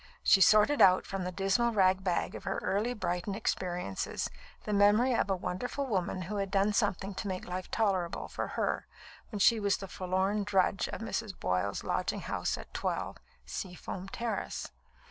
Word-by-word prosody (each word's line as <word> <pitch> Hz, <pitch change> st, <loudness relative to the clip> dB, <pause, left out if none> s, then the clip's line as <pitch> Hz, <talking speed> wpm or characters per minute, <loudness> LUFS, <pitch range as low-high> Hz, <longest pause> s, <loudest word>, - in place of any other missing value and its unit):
She 195 Hz, -, +6 dB
sorted 215 Hz, +9 st, +6 dB
out 185 Hz, -1 st, +6 dB
from 195 Hz, -2 st, -4 dB
the 180 Hz, -, -2 dB
dismal 195 Hz, +6 st, +1 dB
rag 190 Hz, -2 st, +3 dB
bag 180 Hz, -3 st, 0 dB
of -, -, -8 dB
her -, -, -2 dB
early 220 Hz, +5 st, 0 dB
Brighton 180 Hz, -1 st, -2 dB
experiences 180 Hz, -, -2 dB, 0.3 s
the 210 Hz, -, -2 dB
memory 205 Hz, +5 st, +5 dB
of 215 Hz, -, +1 dB
a 195 Hz, -, +2 dB
wonderful 245 Hz, +10 st, -3 dB
woman 185 Hz, -5 st, -1 dB
who 205 Hz, +4 st, -4 dB
had 195 Hz, -1 st, -1 dB
done 200 Hz, +1 st, +2 dB
something 200 Hz, -2 st, 0 dB
to 200 Hz, -, -5 dB
make 185 Hz, -1 st, -3 dB
life 180 Hz, +1 st, -5 dB
tolerable 190 Hz, -6 st, 0 dB
for -, -, -4 dB
her -, -, -1 dB, 0.4 s
when 215 Hz, -, -5 dB
she 225 Hz, +3 st, +5 dB
was 200 Hz, -2 st, +2 dB
the 195 Hz, -, -7 dB
forlorn 190 Hz, +3 st, 0 dB
drudge 195 Hz, -1 st, +2 dB
of -, -, -6 dB
Mrs. 225 Hz, -3 st, -4 dB
Boyle's 90 Hz, +2 st, -1 dB
lodging -, -, -1 dB
house -, -, -2 dB
at -, -, -11 dB
12, -, -, -2 dB, 0.3 s
Seafoam 180 Hz, -, -6 dB
Terrace. 230 Hz, +2 st, -3 dB
195 Hz, 175 wpm, -31 LUFS, 185-210 Hz, 0.4 s, She